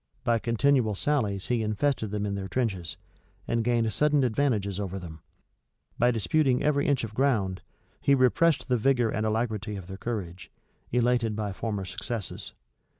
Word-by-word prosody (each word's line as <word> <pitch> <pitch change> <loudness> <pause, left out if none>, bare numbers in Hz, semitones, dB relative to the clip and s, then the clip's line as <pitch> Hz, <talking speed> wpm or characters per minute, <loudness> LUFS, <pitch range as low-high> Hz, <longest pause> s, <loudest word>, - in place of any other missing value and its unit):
By 120 -2 +2
continual 115 -1 +2
sallies 105 -7 0
he 120 -2 0
infested 110 +2 0
them 105 0 -2
in 100 - -2
their 100 -1 -4
trenches, 95 -6 -2 0.5
and 115 -1 +1
gained 115 -2 +1
sudden 150 +1 +3
advantages 110 -6 0
over 95 -1 -3
them: 80 -4 -9 0.8
by 120 - +5
disputing 125 - +2
every 145 -1 +2
inch 140 -4 +2
of 110 -1 -5
ground, 110 -8 +1 0.4
he 140 - +4
repressed 135 +5 +3
the 125 -2 +2
vigor 120 -1 +2
and 110 0 -1
alacrity 110 -2 -1
of 95 -3 -7
their 95 +1 -8
courage, 95 -6 -5 0.4
elated 120 -2 +2
by 105 -2 -3
former 105 -1 -3
successes. 110 +2 -5
115 Hz, 155 wpm, -27 LUFS, 100-125 Hz, 0.8 s, by